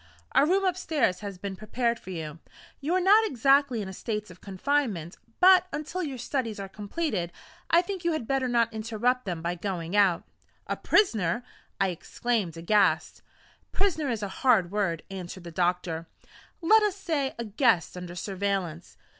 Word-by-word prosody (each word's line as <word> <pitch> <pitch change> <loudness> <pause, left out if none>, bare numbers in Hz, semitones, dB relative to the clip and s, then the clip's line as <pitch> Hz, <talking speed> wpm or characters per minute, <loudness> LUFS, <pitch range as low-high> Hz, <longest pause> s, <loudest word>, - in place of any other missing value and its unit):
A 290 - +5
room 385 +3 +2
upstairs 315 - +1
has 200 -3 -6
been 195 +1 -5
prepared 235 +3 -1
for - - -12
you. 160 -3 -6 0.4
You 315 +6 0
are - - +4
not 405 +4 +6
exactly 270 - +3
in - - -6
a 190 - -7
state 210 0 -4
of 180 - -15
confinement; 200 - -1 0.2
but, 370 0 +7
until 310 +5 -4
your 280 -6 -4
studies 240 -3 -3
are 195 - -5
completed, 205 - -3 0.4
I 340 +1 +5
think 380 -1 -5
you 340 - +2
had 310 -7 -3
better 270 -1 +1
not 235 -2 +2
interrupt 225 +3 0
them 175 -4 -4
by 170 +1 0
going 175 -1 -4
out." 195 -4 +4 0.4
"A - - -2
prisoner!" 220 - +2 0.4
I 195 -1 +3
exclaimed 185 0 -2
aghast. 205 +5 +2 0.5
"Prisoner 330 -8 0
is 225 -3 -2
a - - -1
hard 210 -9 +4
word," 190 -6 -1
answered 185 -1 -7
the 170 - -8
doctor. 175 -1 -1 0.6
"Let 435 +6 +6
us 415 -3 +1
say, 315 -9 -2
a 235 - -3
guest 215 - +2
under 180 -1 -7
surveillance." 190 -3 -3
215 Hz, 170 wpm, -27 LUFS, 180-285 Hz, 0.6 s, but